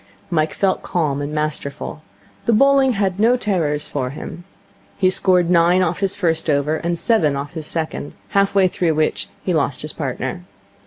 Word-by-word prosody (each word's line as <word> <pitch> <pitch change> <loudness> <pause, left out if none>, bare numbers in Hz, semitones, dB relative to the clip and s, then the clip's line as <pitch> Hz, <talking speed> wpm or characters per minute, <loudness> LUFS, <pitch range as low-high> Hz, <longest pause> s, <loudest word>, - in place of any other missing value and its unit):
Mike 155 -2 +1
felt 195 -1 +1
calm 150 -5 -1
and 145 +1 -4
masterful. 150 -1 -3 0.4
The 235 - +3
bowling 275 +2 +4
had 195 -2 -1
no 235 +4 +4
terrors 160 -10 0
for 130 -3 -2
him. 160 +5 -8 0.5
He 185 -1 +3
scored 180 -2 +3
nine 175 +2 +4
off 175 0 -1
his 195 -1 0
first 165 -4 0
over 150 +2 +1
and 170 +1 -2
seven 165 - +2
off 140 +1 -5
his 160 -2 -5
second, 160 -3 -3 0.2
half 200 0 +2
way 195 -1 +5
through 170 -3 0
which 155 0 0
he 180 - 0
lost 145 -4 0
his 150 - -5
partner. 135 +3 -4
170 Hz, 175 wpm, -20 LUFS, 150-190 Hz, 0.5 s, way